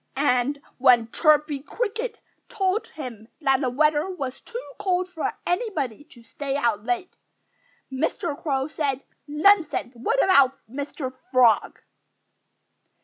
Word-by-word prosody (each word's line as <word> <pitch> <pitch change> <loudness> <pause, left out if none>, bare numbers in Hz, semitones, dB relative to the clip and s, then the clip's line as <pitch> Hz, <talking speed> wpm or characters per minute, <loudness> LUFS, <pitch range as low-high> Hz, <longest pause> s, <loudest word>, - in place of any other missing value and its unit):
And 275 0 +1 0.2
when 240 -3 +5
Chirpy 300 -2 +3
Cricket 460 - -3 0.3
told 405 -2 0
him 240 -8 -8
that 270 -3 +2
the 260 - +1
weather 300 +6 +2
was 275 -8 -5
too 485 +2 -7
cold 365 -1 0
for 365 -3 -3
anybody 325 - -2
to 270 -7 -17
stay 270 +5 -4
out 235 -7 0
late, 365 +7 -2 0.8
Mr. 295 +3 -1
Crow 270 -4 0
said 280 -4 -2 0.2
"Nonsense! 310 -2 +3
What 445 - +1
about 275 -8 +5
Mr. 270 +1 -5 0.2
Frog?" 245 -4 +3
290 Hz, 120 wpm, -24 LUFS, 255-360 Hz, 0.8 s, when